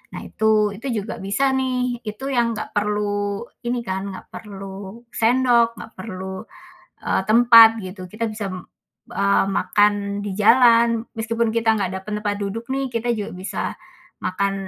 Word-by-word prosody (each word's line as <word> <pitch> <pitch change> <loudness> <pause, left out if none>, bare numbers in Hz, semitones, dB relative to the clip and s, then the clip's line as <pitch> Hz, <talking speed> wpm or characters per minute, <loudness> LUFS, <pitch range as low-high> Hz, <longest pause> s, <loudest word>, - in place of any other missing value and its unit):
Nah, - - -6
itu, 220 0 +1 0.2
itu 225 +7 -7 0.2
juga 215 - -6
bisa 205 +8 +1
nih, 255 -1 0 0.3
itu 215 +6 -9
yang 240 -1 +3
nggak 215 - -6
perlu 205 0 0 0.5
ini 245 0 0
kan, 190 0 -2
nggak 190 - -10
perlu 195 -2 -8 0.4
sendok, 240 0 +4
nggak 225 - -10
perlu, 190 -1 -6 0.7
eee, - - +2
tempat 230 0 +9 0.2
gitu. 185 +1 -8
Kita 225 +2 -3
bisa 215 -1 -5
m - - -5 0.6
eee, 200 0 +3
makan 205 0 +3 0.3
di 205 - -3
jalan. 235 +1 +6 0.3
Meskipun 230 0 0
kita 225 -1 +1
nggak 190 -2 -1
dapet 210 - -9
tempat 205 -1 -2
duduk 210 +4 -4
nih. 270 0 -1
Kita 230 +1 -1
juga 205 - -4
bisa 190 - -4 0.6
makan 195 +2 0
215 Hz, 155 wpm, -22 LUFS, 200-235 Hz, 0.7 s, tempat